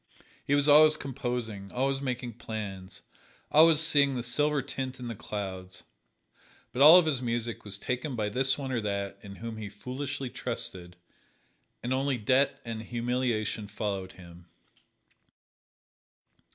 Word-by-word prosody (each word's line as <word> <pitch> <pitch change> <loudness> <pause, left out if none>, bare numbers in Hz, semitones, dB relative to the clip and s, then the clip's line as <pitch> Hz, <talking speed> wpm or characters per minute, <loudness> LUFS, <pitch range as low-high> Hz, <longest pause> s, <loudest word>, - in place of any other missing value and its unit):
He 140 - +1
was 145 0 +4
always 155 +1 +7
composing, 120 -7 -4
always 135 +2 -1
making 125 -3 -4
plans, 100 -5 -7 0.5
always 160 0 +7
seeing 140 -4 +4
the 120 - -3
silver 145 +3 +1
tint 130 0 -5
in 120 -1 -6
the - - -3
clouds, 95 -3 -6 0.9
but 125 - -2
all 155 +5 +10
of 180 - +4
his 140 -5 0
music 120 -1 -3
was 100 -2 -4
taken 125 +5 -3
by 105 -2 -1
this 130 +4 +1
one 135 -2 -5
or 120 -3 -1
that 100 -1 -3
in 100 -1 -10
whom 115 +1 -7
he 105 -2 -6
foolishly 130 +5 -5
trusted, 90 -1 -5 0.9
and 125 +2 -1
only 135 0 0
debt 130 +5 +2
and 115 -1 -5
humiliation 120 -2 -2
followed 100 -2 -4
him. 85 -1 -14
120 Hz, 140 wpm, -29 LUFS, 105-135 Hz, 0.9 s, all